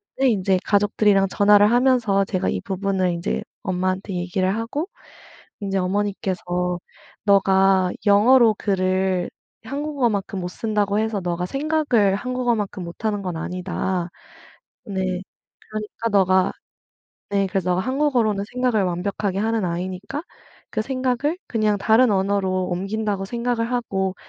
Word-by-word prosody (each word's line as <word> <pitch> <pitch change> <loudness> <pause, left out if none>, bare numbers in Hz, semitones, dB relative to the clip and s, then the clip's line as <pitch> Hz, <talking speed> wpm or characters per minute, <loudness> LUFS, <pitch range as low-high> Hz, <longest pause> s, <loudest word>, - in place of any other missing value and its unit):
그랬는데 265 -1 +3
인제 190 -2 +1
가족들이랑 205 -1 +3
전화를 205 +1 +5
하면서 240 -5 +3
제가 185 -2 -1
이 - - -2
부분을 195 -2 -1
인제 170 +3 -2 0.2
엄마한테 185 +1 -2
얘기를 185 +2 0
하고 240 +9 -3 0.7
인제 195 -1 -1
어머니께서 180 -2 -1 0.5
"너가 195 -2 +4 0.2
영어로 225 +3 +6
글을 185 -2 0 0.4
한국어만큼 250 -8 -1
못 175 - -3
쓴다고 210 0 0
해서 220 -1 -1
너가 175 0 -2
생각을 275 -7 +1
한국어만큼 240 -4 -2
못 170 +5 -8
하는 205 -2 0
건 180 -3 -3
아니다." 180 +1 -3 0.8
네. 190 -2 -2 0.5
"그러니까 215 +1 -4
너가" 190 -2 +3 0.8
네. 200 -1 +2
"그래서 185 -1 -1
너가 180 +1 +1
한국어로는 250 -6 +1
생각을 250 -5 +1
완벽하게 185 +2 -2
하는 220 0 0
아이니까 185 - -4 0.5
그 215 - -1
생각을 260 +6 -1
그냥 215 -3 +1
다른 225 +4 +4
언어로 190 -1 0
옮긴다고 195 +2 -2
생각을 235 +1 -1
하고 190 -6 -1
200 Hz, 315 characters per minute, -22 LUFS, 185-225 Hz, 0.8 s, 영어로